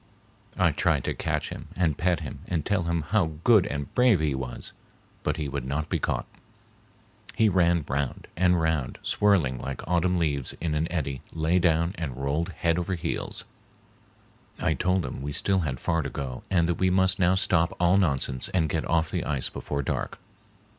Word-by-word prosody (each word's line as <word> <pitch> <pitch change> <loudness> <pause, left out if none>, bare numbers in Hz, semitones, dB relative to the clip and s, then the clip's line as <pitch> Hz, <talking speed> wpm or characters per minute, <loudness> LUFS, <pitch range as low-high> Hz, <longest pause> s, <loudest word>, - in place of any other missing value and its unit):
I - - +4
tried - - +1
to - - -1
catch - - -2
him - - -8
and 85 -5 +1
pet 85 +1 +1
him 75 - -6
and 80 -5 -1
tell 95 -4 +1
him 85 -1 0
how 90 -6 +2
good 110 -6 +6
and 70 0 -4
brave 125 -5 +5
he 75 -2 +1
was, 65 -2 -4 0.5
but - - -1
he 75 - -2
would 70 -1 -3
not 70 +4 -2
be - - 0
caught. - - -1 1.1
He 110 -1 +4
ran 85 -4 +3
round 70 0 -2
and 90 0 +3
round, 80 -5 0
swirling 85 -12 +2
like 70 +1 -6
autumn 90 +1 +2
leaves 70 -6 -1
in 80 -1 -3
an 80 +2 -1
eddy, 70 -6 -2
lay 80 +3 +2
down 85 +1 +2
and 70 -7 -4
rolled 70 +5 -1
head 85 0 0
over 90 +2 -1
heels. 85 -1 -4 1.1
I - - +2
told 90 -1 +1
him - - -5
we 70 +1 -3
still 95 +4 +2
had 70 -7 -2
far 85 0 0
to - - -3
go 65 -3 -5
and 85 -3 +3
that 85 - -1
we 95 - +3
must 95 +1 +2
now 90 0 +4
stop 85 -3 +2
all 90 +2 +4
nonsense 70 -8 0
and 80 -4 +1
get 80 +1 -2
off 80 -1 +2
the - - -1
ice 70 -4 -1
before 70 -1 -3
dark. - - -3
85 Hz, 190 wpm, -27 LUFS, 70-90 Hz, 1.1 s, good